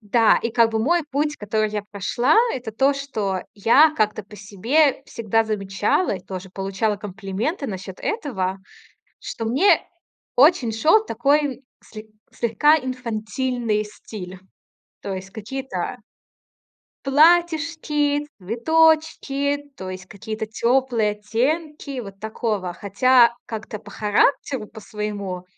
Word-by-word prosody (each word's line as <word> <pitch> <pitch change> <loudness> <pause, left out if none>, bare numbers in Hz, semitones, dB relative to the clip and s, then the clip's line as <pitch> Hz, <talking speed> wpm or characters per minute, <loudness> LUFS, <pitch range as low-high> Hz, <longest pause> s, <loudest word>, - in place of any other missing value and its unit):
да, 225 +1 +4
и 230 - -1
как 230 0 +3
бы 220 - -1
мой 335 +9 +2
путь, 295 +2 -1
который 215 0 -1
я 210 -1 -3
прошла- 240 - +1 0.2
это 240 -3 -6
то, 270 +6 +2
что 215 -10 -3
я 270 +10 +5
как-то 215 0 0
по 210 +2 -15
себе 235 +9 +1
всегда 225 0 0
замечала 205 - 0
и 185 - -10
тоже 190 0 -8
получала 195 +2 -1
комплименты 205 - -4
насчёт 190 -2 -6
этого, 195 - -2 0.6
что 225 - -6
мне 275 - +3 0.5
очень 260 -4 +5
шёл 320 - +3
такой 275 - +1 0.2
сле 215 0 -11 0.2
слегка 240 +7 +3
инфантильный 240 -3 -2
стиль, 190 -3 -9 0.6
то 200 - -4
есть 190 0 -7
какие-то 265 +6 -5 1.1
платьишки, 305 -1 +2
цветочки, 285 - +1
то 185 0 -6
есть 185 0 -8
какие-то 215 +2 -6
тёплые 235 0 +1
оттенки 270 +7 -2
вот 195 -3 -10
такого 215 -4 -3
Хотя 235 +5 +4
как-то 215 -1 -6
по 205 -1 -14
характеру 215 +3 +1
по-своему 205 -4 -6
225 Hz, 115 wpm, -22 LUFS, 205-280 Hz, 1.1 s, я